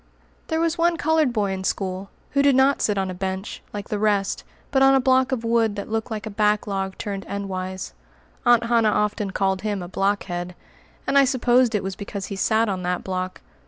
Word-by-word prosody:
There 320 -1 0
was 335 +1 0
one 340 0 +3
colored 310 -3 +2
boy 210 -4 0
in 190 0 -4
school, 190 0 -2 0.2
who 280 - +3
did 280 -1 +4
not 270 +1 +4
sit 210 -2 +1
on 190 -1 -1
a - - -5
bench, 190 +2 -4
like 205 -1 -6
the 210 - -1
rest, 205 -2 +1 0.3
but 270 -1 +3
on 270 0 +6
a - - +5
block 260 0 +3
of 245 -3 -1
wood 230 -2 +2
that 205 +1 -6
looked 225 +1 -1
like 220 -1 -4
a 220 - -5
backlog 200 -2 0
turned 200 -3 -4
endwise. 190 -2 -4 0.5
Aunt 240 -1 +5
Hannah 230 -2 +3
often 210 -1 0
called 190 -1 0
him 205 -3 -2
a - - -6
"blockhead," 180 -2 -2 0.5
and 280 - +4
I 275 - +6
supposed 250 -2 +3
it 205 - 0
was 190 0 -4
because 200 0 -6
he - - -4
sat 220 +4 +2
on 190 -3 -2
that 180 0 -2
block. 185 -1 -4
210 Hz, 210 wpm, -23 LUFS, 195-240 Hz, 0.5 s, on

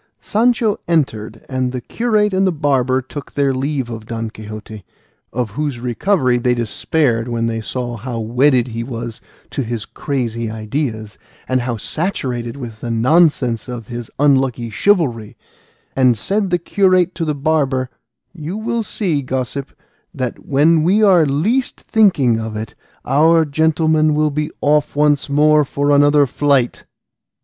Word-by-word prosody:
Sancho 225 -1 +1
entered, 115 -10 -1
and 130 -1 -1
the 130 - -3
curate 210 - 0
and 190 +1 +2
the - - +2
barber 130 -4 +1
took 140 +3 -9
their 140 -1 +2
leave 135 -1 -2
of 115 -2 -8
Don 115 -1 -4
Quixote, 110 -1 -9 0.5
of 120 -3 -2
whose 145 +1 -3
recovery 125 - +1
they 125 0 +1
despaired 120 +1 0
when 115 -1 -1
they 115 -1 -2
saw 120 +1 -4
how 120 +1 -5
wedded 125 +3 +2
he 115 0 -4
was 115 -2 -6 0.3
to - - -2
his 115 -3 -4
crazy 115 -5 -3
ideas, 110 -1 -4 0.3
and 130 -1 +1
how 120 -1 -3
saturated 125 - -3
with 115 -5 -8
the 120 - -4
nonsense 125 -1 +2
of 120 -3 -7
his 120 -1 -6
unlucky 130 -5 +2
chivalry; 120 - +1 0.6
and 125 -3 +3
said 195 - -1
the 175 - +2
curate 185 0 +2
to 170 - -3
the 155 -2 -1
barber, 135 -3 0 0.4
"You 170 +3 -6
will 230 +1 -2
see, 185 -8 -1
gossip, 130 +1 -4 0.4
that 130 -4 -4
when 155 +4 +4
we 195 +7 +3
are 180 -6 +5
least 210 - 0
thinking 145 - +3
of 110 -1 -5
it, 110 0 -6 0.3
our 160 +4 +4
gentleman 155 0 +2
will 155 0 +2
be 150 +2 -2
off 150 0 +2
once 145 -1 +2
more 150 +1 +4
for 145 +1 -1
another 145 0 +5
flight." 135 -2 0
135 Hz, 150 wpm, -18 LUFS, 120-155 Hz, 0.6 s, are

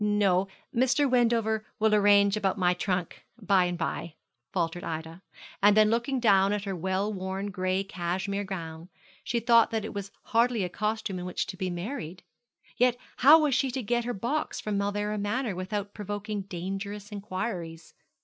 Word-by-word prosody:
'No; 200 -3 +2 0.3
Mr. 260 +4 +3
Wendover 230 -3 +2
will 220 0 +2
arrange 200 -1 +5
about 205 -1 0
my 180 -2 +3
trunk 180 -1 -3 0.2
by 195 -4 +3
and 175 0 -2
by,' 165 -1 -3 0.4
faltered 175 -1 -2
Ida; 160 +2 -5 0.4
and 205 +1 +6
then 215 0 +6
looking 240 +3 0
down 200 -4 +4
at 205 -1 -2
her 195 -2 -3
well 190 +4 -1
worn 190 +1 -4
gray 185 0 0
cashmere 190 +2 -3
gown, 170 -3 -6 0.3
she 240 - -1
thought 230 0 +5
that 220 -2 -2
it - - -6
was 200 -1 -5
hardly 235 -2 +2
a 180 - -2
costume 210 -1 -2
in 180 - -5
which 180 - -2
to - - -7
be 185 -1 -2
married. 175 - -5 0.5
Yet 245 0 +3 0.2
how 305 +5 +7
was 295 -3 +2
she 270 +1 +2
to 255 0 -3
get 240 +2 0
her 245 - -2
box 265 +10 -2
from 210 -1 -3
Mauleverer 205 +1 -1
Manor 215 +2 -1
without 200 +2 -4
provoking 205 0 -4
dangerous 195 +3 -5
inquiries? 185 -5 -5
200 Hz, 170 wpm, -28 LUFS, 185-220 Hz, 0.5 s, how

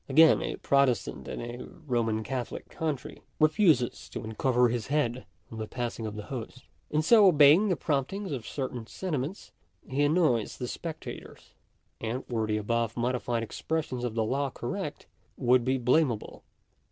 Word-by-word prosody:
Again, 160 +3 +6
a - - -2
Protestant 140 -3 +1
in - - -5
a 120 +1 -6
Roman 115 -5 -2
Catholic 125 0 -5
country, 150 -2 -4 0.2
refuses 155 - +3
to - - -6
uncover 120 +3 +2
his 115 -2 -2
head 130 -4 0 0.2
on 110 - -7
the 110 - -4
passing 120 -2 -4
of 105 - -6
the 105 - -6
host. 130 +2 -7 0.3
In 155 +1 +1
so 210 +3 +7
obeying 155 +5 +6
the 180 - +2
promptings 160 +7 -2
of 125 -6 -4
certain 125 -4 -4
sentiments, 165 - -4 0.4
he 135 +3 -1
annoys 145 - +2
the 125 - -4
spectators; 165 +5 -8 0.5
and 115 +4 -4
were 110 -3 -1
the 105 0 0
above 115 +2 -1
modified 120 -1 -1
expression 130 +1 -3
of 120 -3 -2
the 115 - +1
law 135 +4 0
correct, - - -5 0.3
would 125 0 +4
be 130 +2 +1
blame 130 +3 +3
able. 110 - -8
130 Hz, 160 wpm, -29 LUFS, 115-150 Hz, 0.5 s, so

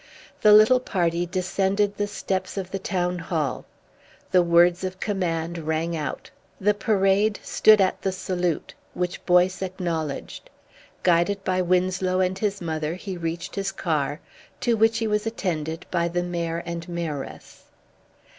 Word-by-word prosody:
The 210 - +6
little 215 +4 +7
party 175 -6 0
descended 195 +2 0
the 205 0 -1
steps 190 -2 -3
of 190 -1 -4
the 195 - -3
Town 180 -1 -1
Hall. 160 -5 -2 0.7
The 185 - +6
words 175 +1 +4
of 185 0 -4
command 170 -4 -2
rang 160 +1 -1
out. 155 -2 -5 0.3
The 210 +2 +3
Parade 205 0 +2
stood 215 -1 +5
at 190 -1 +1
the 190 - 0
salute, 180 -3 -2 0.2
which 180 0 -3
Boyce 180 +1 +4
acknowledged. 170 -6 -4 0.5
Guided 180 +3 +2
by 185 -1 +1
Winslow 185 +1 +1
and 185 +1 0
his 200 -2 -1
mother 160 -1 -2
he 190 0 -6
reached 165 0 -4
his 195 -1 -2
car, 150 -3 -1 0.4
to 240 -2 +2
which 225 +1 +3
he 225 - -1
was 210 0 0
attended 165 -6 -3
by 170 0 +1
the 175 +1 -1
Mayor 170 -1 -3
and 170 0 -5
Mayoress. 165 -5 -6
180 Hz, 145 wpm, -24 LUFS, 170-195 Hz, 0.7 s, little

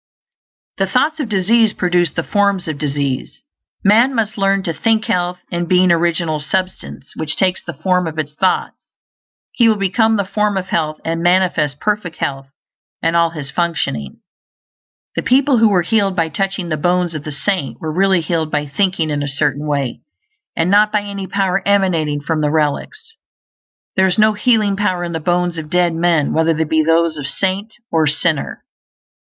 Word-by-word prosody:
The 195 - +2
thoughts 300 +10 +1
of 270 -7 -3
disease 215 +2 +3
produce 175 -2 +1
the 165 - -3
forms 200 -2 0
of 155 -3 -4
disease. 140 -3 -3 0.4
Man 230 +7 +4
must 220 -2 -1
learn 195 -1 +1
to 170 -4 -2
think 220 +7 +1
health; 180 0 -1
and 175 -1 -2
being 185 -1 +4
Original 170 -2 +1
Substance 185 -2 -4
which 155 -1 -2
takes 185 -1 0
the - - -7
form 180 +3 0
of 160 -1 -6
its 150 -1 -3
thoughts, 185 +4 0 0.8
he 235 -2 +3
will 220 - +3
become 220 +3 +2
the 200 - 0
form 210 +1 0
of 190 0 -4
health 155 -2 -1
and 165 0 -2
manifest 175 -5 +1
perfect 210 -5 -2
health 135 -1 -4 0.6
in 165 - +2
all 170 0 +3
his 150 -4 -7
functioning. 145 - -2 0.9
The - - 0
people 265 0 +3
who 225 -1 +5
were 185 -4 +2
healed 200 0 +1
by 165 -2 0
touching 190 +3 -3
the 155 - -1
bones 175 +2 0
of 155 -2 -5
the 150 - -6
saint 175 +1 -2
were 155 -1 -4
really 190 0 +3
healed 160 -1 -1
by 150 -1 -1
thinking 160 +2 0
in 145 -1 -1
a 145 - -2
certain 145 +1 -1
way, 140 -4 -2 0.5
and 170 +3 +1
not 210 +1 +4
by 210 - +1
any 200 -1 -6
power 195 -1 0
emanating 170 -7 +1
from 155 +1 -1
the 150 - +1
relics. 160 - -2 0.8
There 190 0 +4
is 185 - 0
no 215 0 +4
healing 210 -2 +2
power 185 -3 -1
in 170 - -4
the 165 - -3
bones 175 +1 0
of 155 -1 -8
dead 175 0 +2
men, 165 -3 +1
whether 160 0 +2
they 160 - +1
be 160 0 +1
those 165 0 +2
of 145 -2 -4
saint 195 +6 -2 0.2
or 160 -2 +2
sinner. 155 0 -1
175 Hz, 185 wpm, -17 LUFS, 155-195 Hz, 0.9 s, who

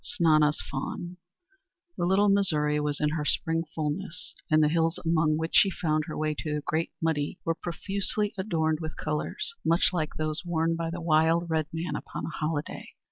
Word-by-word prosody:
V - - -11
SNANA'S 155 -5 +3
FAWN 175 +6 -4 0.8
The 175 - 0
Little 195 +3 +4
Missouri 155 -7 +2
was 150 -1 0
in 150 - +2
her 155 0 -2
spring 165 +2 +1
fulness, 160 +3 -3 0.2
and 155 0 +5
the - - +5
hills 165 +1 +1
among 155 -2 +3
which 160 +1 -3
she 200 - +6
found 155 -4 0
her 155 - -5
way 155 0 0
to 150 -1 -2
the 150 - -2
Great 160 +3 -1
Muddy 155 -3 -1
were 165 - +2
profusely 200 +5 -1
adorned 160 -6 0
with 155 -1 -6
colors, 160 - -3
much 170 +2 +3
like 155 -4 -2
those 155 +1 -2
worn 165 -1 0
by 165 0 -2
the 170 +1 -5
wild 165 +1 +3
red 155 -2 +1
man 165 +2 -3
upon - - -5
a - - -4
holiday! 155 -1 -3
160 Hz, 190 wpm, -28 LUFS, 155-170 Hz, 0.8 s, she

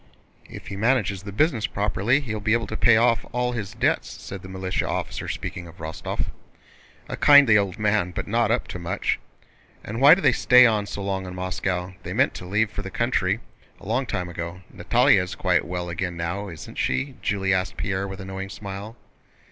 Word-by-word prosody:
"If - - -10
he - - -5
manages 105 -3 +1
the 100 +1 -8
business 115 - +1
properly 105 +6 +1
he 120 -6 -5
will 105 - -4
be 105 +1 +2
able 115 -1 +1
to 110 - -6
pay 115 0 +5
off 115 0 +3
all 125 0 0
his 110 -5 -5
debts," - - +1
said 95 -1 -8
the 95 - -10
militia 95 0 -2
officer, - - -3
speaking 85 -1 -5
of 85 +2 -14
Rostóv. 80 -2 -4 0.8
"A - - -4
kindly 145 -6 +7
old 100 -1 +1
man 105 -4 +1
but 90 - -5
not - - +1
up - - 0
to 90 - -5
much. 85 0 -1 0.6
And 115 +4 -5
why 145 +4 +9
do 195 - -4
they 140 - +5
stay 125 +1 +6
on 105 -3 +2
so 100 - -5
long 95 -1 -2
in 90 - -7
Moscow? 90 0 -3
They - - -6
meant - - +2
to 90 - -8
leave 105 +3 +1
for 100 - -5
the 95 - -6
country 110 -3 0 0.4
long 120 +5 -2
ago. 85 0 -4
Natalie - - +4
is - - -2
quite - - +1
well 90 0 -4
again 85 0 -3
now, 90 +5 -3
isn't 85 -3 -9
she?" 135 +1 -1
Julie 95 -1 0
asked 95 -2 -1
Pierre 100 0 -2
with 95 0 -7
a 95 - -7
knowing 95 0 -6
smile. 100 +2 -7
100 Hz, 205 wpm, -24 LUFS, 95-115 Hz, 0.8 s, why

